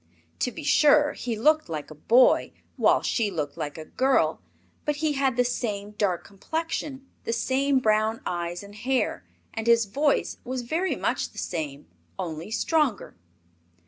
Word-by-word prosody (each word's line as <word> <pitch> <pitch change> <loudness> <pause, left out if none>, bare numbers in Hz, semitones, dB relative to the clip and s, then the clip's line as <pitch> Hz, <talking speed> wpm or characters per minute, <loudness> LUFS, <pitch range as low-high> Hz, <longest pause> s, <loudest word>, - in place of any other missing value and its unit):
To 250 - 0
be 315 - -8
sure, 295 0 +5
he 235 -3 -4
looked 310 - +3
like 155 -2 -5
a - - -6
boy, 235 - +4 0.2
while - - +3
she 225 -4 +1
looked 150 -6 -3
like 145 +1 -5
a 155 - -7
girl, 265 +8 +1 0.4
but 295 - 0
he 300 0 0
had 270 -3 +1
the 250 - +5
same 210 -4 -3
dark 205 -4 0
complexion, 275 - -4 0.2
the - - -2
same 265 +4 +1
brown 220 -2 +2
eyes 175 +1 -3
and 200 0 -12
hair, 250 +5 -1 0.3
and 225 0 -4
his 230 -1 +5
voice 280 +8 +1
was 255 0 -4
very 330 +10 0
much - - -1
the - - -20
same, 150 -4 -4 0.3
only 165 +2 -5
stronger. 275 - 0
235 Hz, 160 wpm, -26 LUFS, 200-275 Hz, 0.4 s, sure